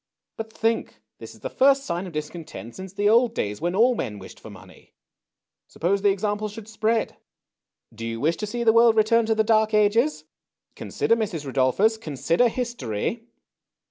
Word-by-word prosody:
" - - -63
But 225 0 -6
think: 225 +1 -2 0.2
this - - -10
is - - -20
the - - -3
first 275 +1 +4
sign 175 +2 -3
of 175 - -10
discontent 150 - -7
since 190 0 -8
the 205 +1 0
old 230 +2 +4
days 105 +4 -3
when 175 +2 -1
all 240 +5 +4
men 115 - -4
wished 95 - -12
for - - -12
money. - - -16 0.7
Suppose 195 +4 -1
the 205 - +4
example 210 +2 -1
should 210 0 -10
spread? 220 +1 -1 0.8
Do 115 +1 -6
you 115 0 -4
wish 160 +5 +1
to 210 - -4
see 235 +3 -3
the 225 -1 +4
world 230 -1 +5
return 220 +1 +3
to 220 - +2
the 220 - +2
Dark 220 0 +2
Ages? 225 +8 +2 0.5
Consider, 230 - 0
Mrs. 190 -10 -3
Rudolphus, 140 - +1
consider 165 - +1
history." 230 - -4
210 Hz, 180 wpm, -24 LUFS, 165-225 Hz, 0.8 s, world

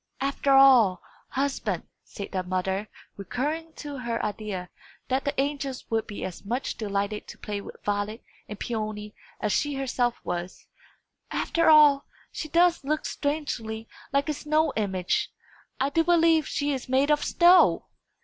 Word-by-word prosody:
"After 275 0 +1
all, 250 -9 +6 0.3
husband," 275 +1 -1 0.2
said 200 - -8
the 185 - -1
mother, 190 +3 -2 0.3
recurring 300 - -3
to 290 -2 -7
her 235 -2 -2
idea 205 -3 -4 0.4
that 265 +2 0
the 285 -1 -1
angels 275 -2 -2
would 225 -1 0
be 205 - -5
as 185 -1 -7
much 240 +6 -2
delighted 205 0 -2
to - - -10
play 205 -1 -5
with - - -10
Violet 205 +2 -2 0.3
and 210 - -7
Peony 215 -2 -4 0.3
as 210 - -1
she 290 +7 0
herself 250 -3 0
was 175 +1 -5 0.6
"after 330 -1 +1
all, 295 -3 +6 0.2
she 310 - -5
does 340 0 +3
look 305 +3 -1
strangely 240 -7 -3 0.2
like 280 +1 +1
a 305 - 0
snow 305 +2 +1
image! 190 -4 -1 0.5
I 270 - +1
do 325 +3 +3
believe 330 -2 +4
she 290 0 -1
is 260 -2 -5
made 270 +3 +3
of 295 - +2
snow!" 350 +1 +5
260 Hz, 150 wpm, -26 LUFS, 210-290 Hz, 0.6 s, all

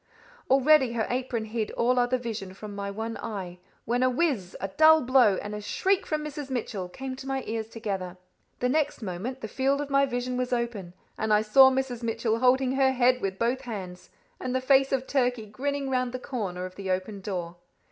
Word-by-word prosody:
Already 270 -1 +5
her 225 -2 0
apron 245 -3 -2
hid 220 0 -3
all 250 +1 +2
other 245 +1 +2
vision 220 -6 -6
from 210 +1 -8
my 200 0 -4
one 225 +3 -4
eye, 185 -5 -6 0.3
when 240 +2 0
a 255 - +4
whizz, 250 - -1
a 195 - -2
dull 315 +8 +6
blow, 245 -6 +4
and 205 - -5
a 210 - -5
shriek 380 - 0
from 305 -1 -2
Mrs. 295 -2 -6
Mitchell 210 -7 -3
came 265 +6 -6
to 265 +1 -9
my 270 -1 -2
ears 220 0 -3
together. 195 -5 -4 0.4
The 250 - +2
next 295 -3 0
moment, 210 +8 -5
the - - -4
field 270 +4 0
of 290 -1 -4
my 275 0 +4
vision 250 0 -2
was 250 0 -2
open, 230 -7 -3 0.2
and 220 0 0
I 210 0 +4
saw 265 +5 +7
Mrs. 260 -2 -2
Mitchell 225 -1 -1
holding 255 +1 +3
her 265 0 +3
head 250 0 +3
with 195 -1 -2
both 240 +4 0
hands, 190 -8 -7 0.3
and 255 0 -3
the - - +2
face 270 +1 +4
of 265 -1 0
Turkey 250 -5 0
grinning 275 +6 -3
round 255 -1 0
the 255 - -3
corner 195 -9 -4
of 185 - -8
the 195 -1 -5
open 190 +2 -2
door. 175 -3 -4
245 Hz, 210 wpm, -27 LUFS, 210-265 Hz, 0.4 s, saw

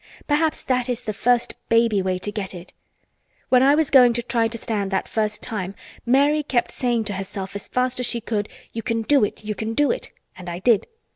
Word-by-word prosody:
Perhaps 305 +1 +1
that 250 -1 0
is 245 -1 -2
the 215 - -3
first 240 +3 +1 0.2
baby 230 -3 +3
way 185 -1 -1
to 205 +3 -5
get 200 -3 -5
it. 175 0 -11 0.8
When 250 -1 +5
I 275 +2 +5
was 310 -2 +1
going 250 -3 +7
to 240 0 -1
try 235 -1 +1
to 230 +1 -6
stand 210 -3 -2
that 190 -1 -1
first 215 -1 -2
time 200 -5 -4 0.3
Mary 285 +4 +4
kept 260 -5 0
saying 240 -3 0
to 205 - -2
herself 195 0 -5
as 200 - -5
fast 250 0 0
as 250 - 0
she 235 - -1
could, 210 -2 -2 0.2
'You 225 - -3
can 230 -1 -1
do 280 +2 +4
it! 210 - -3
You 210 - -2
can 220 +2 -4
do 290 +2 +3
it!' - - -4 0.3
and 180 -1 -8
I 170 - -4
did. 215 +3 +2
230 Hz, 225 wpm, -23 LUFS, 205-250 Hz, 0.8 s, going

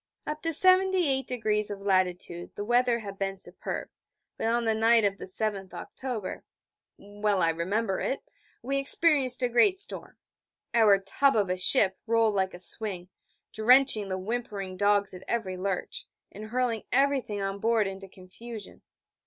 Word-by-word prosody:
Up 300 0 -5
to 330 - -2
78° 280 - +3
of 205 -1 -6
latitude 185 -3 -1
the 205 - -5
weather 240 +1 +2
had 200 -3 -9
been 195 0 -3
superb, 180 -1 -6 0.5
but - - -3
on 235 +1 0
the 225 - +2
night 225 0 +3
of 200 0 -1
the - - -7
7th 195 -1 -4
October 245 -7 -6 0.5
well 205 -1 -2
I 165 - +3
remember 190 +5 -2
it 270 - -2 0.4
we 275 +3 -1
experienced 275 -3 +3
a - - +3
great 245 - +3
storm. 380 - -1 0.6
Our 220 -4 +5
tub 235 +8 +1
of 200 -4 +1
a - - 0
ship 190 0 +3
rolled 225 -1 +2
like 190 -2 -1
a - - -11
swing, 185 -1 0 0.4
drenching 230 -1 +4
the 185 -1 -3
whimpering 200 -2 -5
dogs 205 0 +1
at 180 - -10
every 215 -6 -2
lurch, 195 - -4 0.2
and 215 - -9
hurling 235 -1 -1
everything 270 -7 +1
on 195 0 -3
board 225 0 +1
into 195 0 -7
confusion. 205 +4 -11
215 Hz, 155 wpm, -27 LUFS, 195-245 Hz, 0.6 s, Our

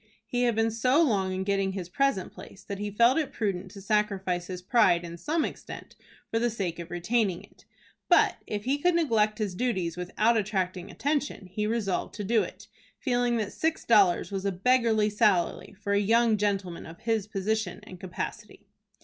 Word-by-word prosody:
He 245 0 0
had 235 -2 +2
been 225 0 +2
so 250 +6 +2
long 195 -9 +1
in 185 0 -2
getting 195 -1 0
his 185 -3 -5
present 200 -1 0
place, 195 - -12
that 200 -1 -6
he 205 0 -3
felt 235 +8 +4
it 305 - -2
prudent 195 -4 -2
to 195 +1 -11
sacrifice 195 -4 0
his 185 -1 -5
pride 180 -3 +3
in 170 0 -7
some 310 - -1
extent - - -8 0.4
for 225 - +1
the 240 +1 +1
sake 190 -7 -3
of 170 0 -7
retaining 180 +2 0
it. - - -20 0.4
But - - +5
if 205 -1 -3
he 275 +4 0
could 355 +3 +2
neglect 225 -10 +2
his 210 -4 -2
duties 185 -6 -1
without 210 +6 +1
attracting 190 -3 -2
attention, 285 -7 -2
he 210 +4 -3
resolved 215 -5 -1
to 210 - -4
do 225 +3 +3
it, - - -7 0.3
feeling 245 -2 +1
that 210 -3 -3
six 320 0 -1
dollars 205 -5 +4
was 195 -1 -3
a 200 - 0
beggarly 220 +1 +2
salary 195 -4 +1
for 200 -1 -1
a 200 - +4
young 225 +2 +3
gentleman 195 -4 -2
of 165 +1 -12
his 225 -3 0
position 215 +1 -2
and 185 - -11
capacity. 180 -1 -6
210 Hz, 190 wpm, -28 LUFS, 185-235 Hz, 0.4 s, But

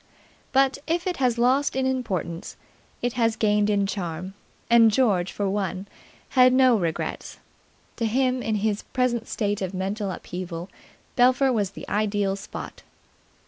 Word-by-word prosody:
But, 270 0 +3
if 340 +2 0
it 360 -2 -2
has 250 -3 +1
lost 255 +4 +2
in 265 0 0
importance, 190 - -3 0.5
it 245 -1 0
has 230 -2 +1
gained 210 -1 +2
in 200 -1 +2
charm; 185 -2 -4 0.3
and 230 -1 +6
George, 205 -7 +2
for 205 - -2
one, 195 -1 -2 0.4
had 255 -1 +5
no 255 -2 +5
regrets. 170 -6 -3 0.6
To 230 - 0
him, 255 +2 +1
in 220 -2 -1
his 210 -1 0
present 240 -3 -1
state 205 -2 -2
of 190 0 -3
mental 195 +2 -2
upheaval, 180 -1 -6 0.4
Belpher 255 +1 +4
was 205 -4 0
the - - -8
ideal 205 -2 0
spot. 195 - -8
215 Hz, 145 wpm, -25 LUFS, 195-255 Hz, 0.6 s, and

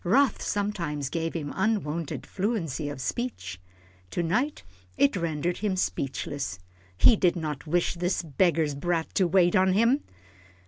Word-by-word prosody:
Wrath 245 +7 +3
sometimes 170 -9 -2
gave 165 -1 -2
him 145 -3 -3
unwonted 180 -7 -1
fluency 185 - -2
of 145 - -6
speech. 100 - -4 0.5
To 175 - -1
night 245 - 0 0.3
it 140 - +4
rendered 170 0 -1
him 205 -3 -1
speechless. 135 - -2 0.4
He 225 - +7
did 180 -3 +2
not 155 -3 -4
wish 175 +3 +1
this 180 +1 -1
beggar's 160 0 +2
brat 165 +3 -1
to 185 - +3
wait 175 +2 +4
on 185 0 +4
him. 230 +8 +3
170 Hz, 140 wpm, -27 LUFS, 150-195 Hz, 0.5 s, He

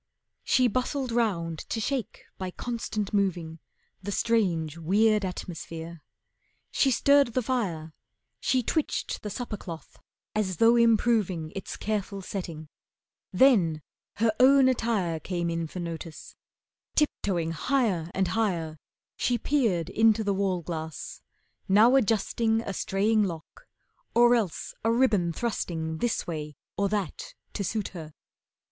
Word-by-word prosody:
She 255 -1 +3
bustled 255 +2 -1
round 175 -9 0
to 225 - -1
shake 245 0 -3 0.2
by 185 -1 -3
constant 215 -1 -4
moving 175 -5 -1 0.4
The 200 +2 -4
strange, 180 -9 +1
weird 205 +6 +2
atmosphere. 170 -2 -6 0.7
She 275 - +3
stirred 280 -1 +4
the 255 - +1
fire, 175 -11 -2 0.5
She 255 -1 +1
twitched 310 +5 -1
the 210 - -5
supper 235 0 -4
cloth 165 -5 -10 0.3
as 190 -5 -1
though 230 +4 +6
improving 220 -8 +2
Its 195 - -5
careful 200 -2 -3
setting, 170 -5 -6 0.6
then 180 - +4 0.3
her 225 +1 +2
own 265 +1 +7
attire 220 -10 0
Came 170 0 -2
in 165 -1 -2
for 180 - -7
notice, 165 -1 -7 0.6
tiptoeing 185 - 0
higher 195 -4 0
and 190 -2 +1
higher 170 -7 -1 0.4
She 245 - +1
peered 225 - +1
into 220 0 +4
the 200 -1 +1
wall 190 -3 0
glass, 160 -1 -6 0.5
now 220 +6 +6
adjusting 225 -1 +2
A 200 - -5
straying 210 +4 +1
lock, 180 - -5 0.5
or 240 +1 +6
else 215 -8 -1
a 225 - +3
ribbon 225 -8 +3
thrusting 160 -6 -3
This 240 -1 0
way 150 -3 -5 0.2
or 200 0 +1
that 215 - -3 0.2
to 200 - -2
suit 210 +1 -2
her. 160 -4 -9
200 Hz, 130 wpm, -27 LUFS, 170-230 Hz, 0.7 s, own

